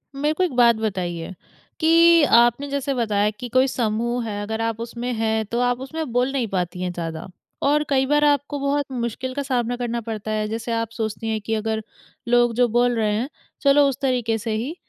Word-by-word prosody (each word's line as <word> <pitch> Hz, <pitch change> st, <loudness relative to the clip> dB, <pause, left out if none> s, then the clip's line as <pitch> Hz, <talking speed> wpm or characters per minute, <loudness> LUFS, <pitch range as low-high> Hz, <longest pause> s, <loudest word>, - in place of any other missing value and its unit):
मेरे 295 Hz, +2 st, 0 dB
को 370 Hz, -, 0 dB
एक 345 Hz, -, -1 dB
बात 235 Hz, -1 st, +5 dB
बताइए, 185 Hz, -5 st, -3 dB, 0.5 s
कि 335 Hz, 0 st, +6 dB
आपने 240 Hz, +1 st, +4 dB
जैसे 280 Hz, 0 st, -1 dB
बताया 210 Hz, -4 st, +1 dB
कि 215 Hz, +4 st, -8 dB
कोई 255 Hz, +2 st, +3 dB
समूह 235 Hz, 0 st, -1 dB
है 205 Hz, -1 st, -4 dB
अगर 220 Hz, +2 st, -3 dB
आप 225 Hz, -1 st, -2 dB
उसमें 235 Hz, +1 st, -4 dB
हैं, 220 Hz, -1 st, 0 dB
तो 235 Hz, +4 st, -3 dB
आप 245 Hz, 0 st, +1 dB
उसमें 310 Hz, -1 st, -5 dB
बोल 250 Hz, +2 st, +1 dB
नहीं 260 Hz, -4 st, -1 dB
पाती 180 Hz, -2 st, -3 dB
हैं 180 Hz, -, -2 dB
ज़्यादा 165 Hz, -1 st, -5 dB, 0.4 s
और 295 Hz, +2 st, +3 dB
कई 265 Hz, -1 st, +2 dB
बार 295 Hz, +2 st, +2 dB
आपको 285 Hz, 0 st, +1 dB
बहुत 280 Hz, +1 st, 0 dB
मुश्किल 255 Hz, +1 st, -3 dB
का 285 Hz, -, -2 dB
सामना 245 Hz, -2 st, -1 dB
करना 235 Hz, -1 st, -2 dB
पड़ता 215 Hz, -1 st, -5 dB
है, 215 Hz, 0 st, -1 dB
जैसे 225 Hz, +2 st, -4 dB
आप 230 Hz, -1 st, -1 dB
सोचती 225 Hz, -1 st, -4 dB
हैं 220 Hz, -1 st, -1 dB
कि 220 Hz, +2 st, -3 dB
अगर 220 Hz, 0 st, -2 dB, 0.4 s
लोग 240 Hz, -1 st, +3 dB
जो 245 Hz, 0 st, +4 dB
बोल 240 Hz, +1 st, +2 dB
रहे 215 Hz, -2 st, +1 dB
हैं, 245 Hz, +6 st, -2 dB, 0.3 s
चलो 280 Hz, 0 st, +5 dB
उस 275 Hz, 0 st, -5 dB
तरीके 245 Hz, -4 st, 0 dB
से 225 Hz, +1 st, -4 dB
ही, 255 Hz, +9 st, -3 dB
240 Hz, 210 wpm, -22 LUFS, 220-270 Hz, 0.5 s, कि